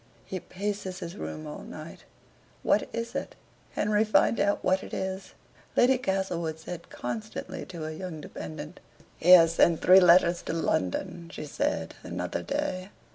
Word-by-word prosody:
"He 190 - -4
paces 195 0 -4
his 170 0 -6
room 155 -6 -6
all 150 - -7
night; 155 +1 -10 0.6
what - - +2
is 230 0 -4
it? - - -4 0.4
Henry, 210 +1 +2
find 220 +1 +3
out 200 0 +1
what 185 +1 +2
it - - -7
is," 190 0 -4 0.4
Lady 255 +1 +5
Castlewood 180 -7 -1
said 170 +1 -8
constantly 215 - -5
to 170 -3 -7
her 155 - -4
young 160 0 -6
dependant. 80 - -8 0.4
"He 175 - 0
has 165 -2 +8
sent 170 -1 +4
three 185 +1 +9
letters 175 -1 +5
to - - -4
London," 165 - -1
she 155 - -6
said, 285 - -2
another - - -3
day. 205 -11 -3
185 Hz, 155 wpm, -28 LUFS, 165-200 Hz, 0.6 s, three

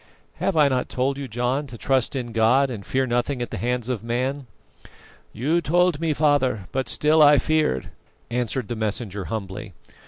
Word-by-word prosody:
"Have 190 - -1
I 150 -2 +6
not 130 -2 -1
told 135 +2 -1
you, 140 - -5
John, 125 +5 -1
to 120 -2 -9
trust 130 +2 0
in 120 -3 -3
God, 125 +4 +3
and 105 -5 -6
fear 130 +5 0
nothing 125 +2 -1
at 120 - -4
the - - -4
hands 120 0 -1
of 125 -4 -3
man?" 130 +3 -2 0.8
"You 155 +9 0
told 175 -1 +2
me, 165 -1 0
father, 145 -9 +1
but 130 0 -2
still 155 +1 +3
I 145 -1 +7
feared," 150 - 0 0.4
answered 120 -1 -2
the 120 - -3
messenger 105 -2 -3
humbly. 105 -2 -6
125 Hz, 180 wpm, -23 LUFS, 115-145 Hz, 0.8 s, I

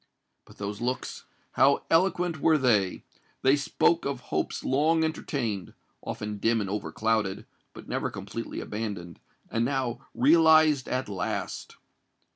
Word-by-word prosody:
But - - -17
those 100 +2 -5
looks—how 130 +2 0
eloquent 175 -2 +2
were 160 -1 +5
they! 105 -9 +2 0.4
They 135 +2 +5
spoke 165 +3 +2
of 140 -2 -2
hopes - - -1
long 155 +4 +2
entertained—often 105 - -4
dim 115 +2 +2
and 100 - -2
overclouded—but 105 -1 -3
never - - -2
completely - - -6
abandoned—and 105 +1 -5
now 130 -2 -2
realized 155 -1 +5
at 130 +1 -1
last! 100 -2 -4
130 Hz, 105 wpm, -27 LUFS, 105-155 Hz, 0.4 s, were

